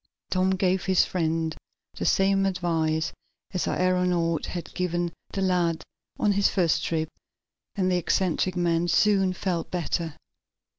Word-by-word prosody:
Tom 185 0 +2
gave 185 -1 +1
his 190 -1 +4
friend 160 -2 -1 0.4
the - - -2
same 195 0 +3
advice 160 -3 0 0.4
the 180 - -1
aeronaut 180 -3 +1
had 175 -2 -6
given 175 -1 -1 0.2
the 195 - -2
lad 175 -3 +1 0.3
on 210 - +2
his 200 0 +3
first 175 -5 +1
trip, 160 -1 -1 0.7
and 185 -2 +1
the 180 - +3
eccentric 180 +1 0
man 170 -1 +1
soon 195 +1 +3
felt 180 -2 -2
better. 170 -2 -2
180 Hz, 135 wpm, -26 LUFS, 165-185 Hz, 0.7 s, his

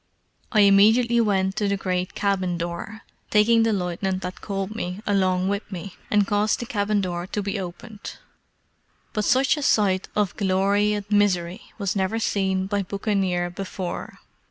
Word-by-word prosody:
I 215 - +4
immediately 220 +4 +5
went 190 -3 +1
to 210 - +1
the 200 0 0
great 185 -1 -2
cabin 185 -3 0
door, 175 +6 -5 0.3
taking 225 +2 +4
the 225 0 +2
lieutenant 185 0 -2
that 180 0 -6
called 195 0 -3
me 180 -2 -4
along 185 -2 +1
with 200 +1 -3
me, 185 0 -7
and 205 -1 +3
caused 205 +1 +1
the 240 - -4
cabin 205 -2 0
door 175 -1 -3
to 205 +1 -3
be 200 +1 -2
opened. 205 +4 -8 1.0
But 210 -1 -1
such 265 +4 +3
a - - -3
sight 195 -8 +2
of 205 -3 0
glory 200 +1 +2
and 205 -1 -3
misery 185 -4 +1 0.2
was 200 -3 -2
never 195 +3 0
seen 190 -4 0
by 200 +1 -1
buccaneer 190 -3 -1
before. 185 -1 -6
200 Hz, 160 wpm, -24 LUFS, 185-210 Hz, 1.0 s, immediately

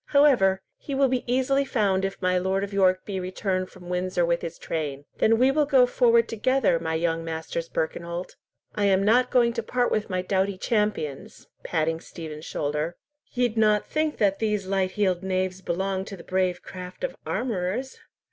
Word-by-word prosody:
However, 245 -11 +4 0.2
he 280 - -5
will 270 -1 +3
be 255 -1 0
easily 265 +2 +2
found 200 -8 +1
if 195 0 -3
my 185 0 +2
Lord 190 +2 0
of 200 0 -5
York 185 -1 +3
be 195 -2 -3
returned 185 0 -2
from 180 -1 -14
Windsor 180 0 0
with 170 0 0
his 170 -1 -6
train." 145 -3 -4
"Then 225 +1 +4
will 260 +3 +4
we 300 0 +3
go 260 -3 +6
forward 235 -2 +3
together, 230 -5 +2
my 160 -1 -2
young 165 0 0
Masters 165 +1 -4
Birkenholt. 170 +2 -3 0.4
I 205 - 0
am 195 -1 +3
not 245 +5 +4
going 235 -2 +3
to 230 - -2
part 245 +2 0
with 215 0 0
my 185 -1 -1
doughty 190 +1 0
champions!"—patting 165 - -2
Stephen's 155 -2 -9
shoulder. 150 +4 -2 0.4
"Ye'd 245 -3 0
not 215 -1 +3
think 310 0 -1
that 195 -2 +2
these 210 -3 0
light 190 -1 0
heeled 190 -4 +1
knaves 185 0 -1
belonged 190 +2 -2
to 195 - -7
the 170 - -11
brave 185 -1 0
craft 180 - -9
of - - -2
armourers?" 230 +2 -2
190 Hz, 180 wpm, -25 LUFS, 180-230 Hz, 0.4 s, go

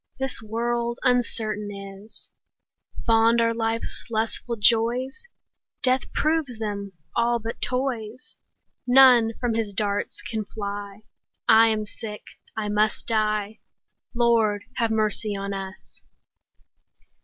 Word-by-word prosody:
This 265 -3 -2
world 235 +2 -2
uncertain 220 -4 +1
is: 195 +1 -8 0.7
Fond 230 +1 +4
are 230 0 +3
life's 225 0 -2
lustful 225 +1 -1
joys, 240 - +2 0.6
Death 255 0 +1
proves 305 -6 0
them 200 -3 -4 0.2
all 235 0 +2
but 230 0 -6
toys. 250 -2 -3 0.5
None 245 -3 +7
from 245 -2 0
his 220 -2 -1
darts 205 0 -2
can 220 -2 -3
fly; 200 -1 -6
5 - - -40 0.5
I 225 +1 +8
am 215 -1 0
sick, 210 0 -7 0.3
I 215 -1 -1
must 210 +1 +1
die— 215 -1 0 0.6
Lord, 225 -4 +3
have 230 -2 +2
mercy 215 -1 +1
on 200 0 -4
us! 190 -1 -8
225 Hz, 115 wpm, -25 LUFS, 210-235 Hz, 0.7 s, I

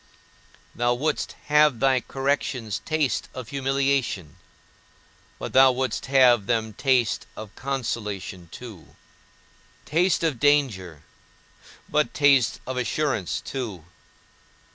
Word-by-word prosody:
Thou 120 +1 +1
wouldst 150 +4 -2
have 150 -4 +4
thy 135 0 +3
corrections 135 -5 -2
taste 155 -4 -1
of 125 -3 -7
humiliation, 135 - -1 1.0
but - - -6
thou 130 0 +7
wouldst 130 -1 -2
have 125 -6 +5
them 110 -2 0
taste 125 -1 +1
of 110 -1 -9
consolation 105 -9 -4
too; 110 -9 -11 0.9
taste 170 +3 +1
of 155 -7 0
danger, 115 - +1 0.8
but 150 0 0
taste 140 -4 +4
of 130 0 -4
assurance 125 - -1
too. 110 - -6
130 Hz, 100 wpm, -24 LUFS, 110-140 Hz, 1.0 s, thou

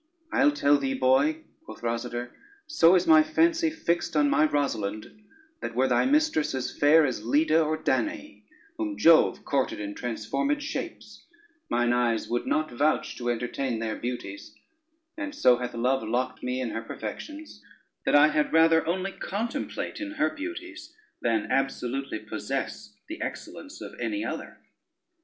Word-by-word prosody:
"I'll 270 0 +4
tell 145 - +3
thee 135 -1 -1
boy," 130 - +2 0.2
quoth 320 - -12
Rosader, 120 +1 -3 0.3
"so 190 - +5
is 180 - +3
my 155 -1 +7
fancy 325 - +2
fixed 175 - -2
on 145 -1 +3
my 155 - +4
Rosalynde, 110 -8 -2 0.5
that 115 - -5
were 130 +2 +3
thy 125 - +2
mistress 295 - +2
as 130 -1 -4
fair 150 +2 +5
as 125 -6 -3
Leda 155 +6 +3
or 155 0 -1
Danaë, 305 - -2 0.4
whom 315 -2 -3
Jove 165 -1 +5
courted 140 -2 0
in 105 -1 -5
transformed 125 - -2
shapes, 300 - -7 0.4
mine 120 0 +2
eyes 120 -2 +1
would 120 0 -2
not 155 -2 0
vouch 145 +6 0
to 120 -1 -3
entertain 120 +1 -2
their 110 -1 -3
beauties; 120 -5 -6 0.6
and 290 0 -5
so 125 - +5
hath 125 -1 -5
love 130 +3 +1
locked 125 +3 -2
me 125 +1 -2
in 125 -3 -2
her 115 - -3
perfections, 295 - -8 0.4
that - - +2
I 150 +1 +7
had 150 -1 0
rather 160 0 +5
only 190 +3 -1
contemplate 230 +12 -4
in 300 0 -5
her 300 -1 +1
beauties, 340 0 -8 0.3
than 115 -2 0
absolutely 135 -1 -1
possess 135 - -5
the 325 +2 -7
excellence - - -7
of - - -9
any 310 0 -2
other." - - -6
145 Hz, 155 wpm, -27 LUFS, -, 0.6 s, my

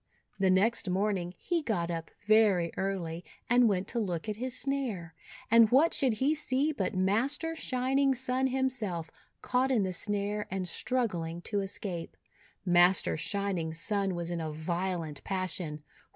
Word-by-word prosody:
The 190 -1 +3
next 200 +2 +2
morning 185 -2 -1
he 345 -2 -1
got 175 - -1
up 165 -1 -4 0.2
very 205 -6 +4
early, 180 -3 -3 0.2
and 245 -1 +5
went 190 -2 -1
to 235 - -1
look 180 -4 -3
at 210 -1 -3
his 255 +1 -3
snare. 240 -12 -2 0.4
And 230 -1 +7
what 285 +8 +4
should 260 -4 +2
he 265 +8 +1
see 290 -1 0
but 265 -7 -2
Master 255 - 0
Shining 270 -1 +1
Sun 260 +1 0
himself 245 -11 -1 0.3
caught 255 +1 +1
in 240 -6 +2
the 185 -1 -2
snare 205 +1 -1
and 190 -1 -3
struggling 175 -7 -2
to 205 - -1
escape. 190 -3 -5 0.5
Master 175 +1 +4
Shining 180 -2 -2
Sun 195 +2 -1
was 170 0 -4
in 170 -1 -2
a 160 - -3
violent 165 -1 -3
passion. 180 -5 -2
200 Hz, 150 wpm, -30 LUFS, 175-250 Hz, 0.5 s, And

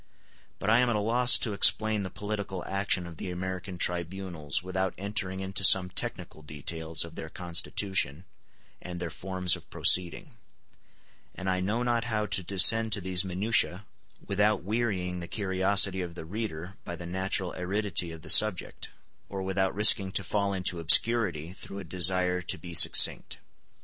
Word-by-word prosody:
But 105 - -2
I 115 - +4
am 125 -1 +1
at 115 - -1
a - - -1
loss 120 +4 +4
to 110 - -3
explain 110 +1 +3
the 95 - -6
political 100 -3 -6
action 95 -2 -2
of 85 -2 -12
the 90 - -7
American 95 +1 -7
tribunals 85 -3 -3
without 95 0 -4
entering 95 -1 -5
into 95 +1 -4
some 90 -1 +5
technical 80 - -5
details 80 +2 -2
of 85 - -13
their 80 - -9
constitution 90 -1 -2 0.6
and 90 -1 -8
their 85 -2 -6
forms 90 +1 -1
of - - -15
proceeding; 90 -2 +2 1.0
and 95 - -8
I 95 0 -1
know 105 +6 -2
not 120 -1 -1
how 110 -2 -3
to 100 -2 -3
descend 110 +5 +4
to 105 - -2
these 90 0 +2
minutiae 95 +1 0 0.4
without 105 +1 0
wearying 95 -4 -3
the 85 - -8
curiosity 95 0 +1
of 85 -2 -8
the 80 - -9
reader 95 -2 -7
by 85 - -7
the 85 0 -10
natural 95 +1 -4
aridity 95 -1 -1
of 80 -1 -12
the 80 - -6
subject, 95 +2 +3 0.4
or 95 -1 -6
without 95 0 -2
risking 100 -2 +4
to 100 - 0
fall 100 +2 -2
into 90 -2 0
obscurity 90 -2 +3
through 100 - -10
a 100 - -7
desire 90 +1 +1
to 90 - -3
be 85 -2 -10
succinct. - - +5
95 Hz, 165 wpm, -27 LUFS, 90-100 Hz, 1.0 s, some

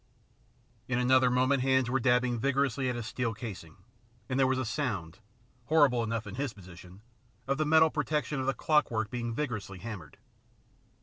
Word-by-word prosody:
In 125 - 0
another 130 0 +4
moment 130 +2 +2
hands 130 -1 +2
were 130 +2 +1
dabbing 125 -1 +2
vigorously 135 0 0
at 125 - -2
his 120 -2 -5
steel 115 -1 -2
casing, 95 -9 -8 0.5
and 130 +1 -1
there 135 - +4
was 130 0 +1
a 130 - -1
sound, 105 - -3 0.5
horrible 145 -4 +4
enough 115 0 -3
in 100 - -8
his 135 +1 -3
position, 90 0 -14 0.4
of 140 +2 -1
the 155 - +1
metal 160 0 +5
protection 150 -2 -1
of 130 - -2
the 135 - +1
clockwork 115 -9 +1
being 120 -1 -3
vigorously 115 -7 -4
hammered. 100 -5 -8
125 Hz, 170 wpm, -30 LUFS, 110-135 Hz, 0.5 s, metal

